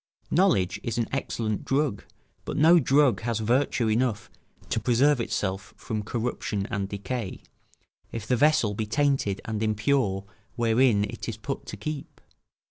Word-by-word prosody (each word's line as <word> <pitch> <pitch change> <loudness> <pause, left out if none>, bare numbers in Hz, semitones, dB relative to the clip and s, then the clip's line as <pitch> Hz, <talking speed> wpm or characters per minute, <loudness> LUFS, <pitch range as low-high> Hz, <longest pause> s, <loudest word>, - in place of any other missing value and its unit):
Knowledge 125 - +2
is 120 - -3
an 115 - 0
excellent 115 -5 -2
drug, 135 -6 0 0.4
but - - -4
no 165 +4 +7
drug 140 -2 +3
has 115 -1 -1
virtue 120 +1 +1
enough 115 0 0 0.4
to - - 0
preserve 130 +2 +3
itself 100 -2 -3
from 110 -1 -3
corruption 110 -2 -3
and 100 -1 -2
decay, 100 +1 -4 0.7
if 115 -2 -5
the 125 - +2
vessel 145 -5 +3
be 110 +1 -3
tainted 135 -6 +1
and 110 -1 -3
impure 110 -2 +1 0.3
wherein 115 -2 +3
it 105 - -5
is - - -5
put - - -5
to - - -6
keep. 150 -2 -6
115 Hz, 145 wpm, -26 LUFS, 105-135 Hz, 0.7 s, no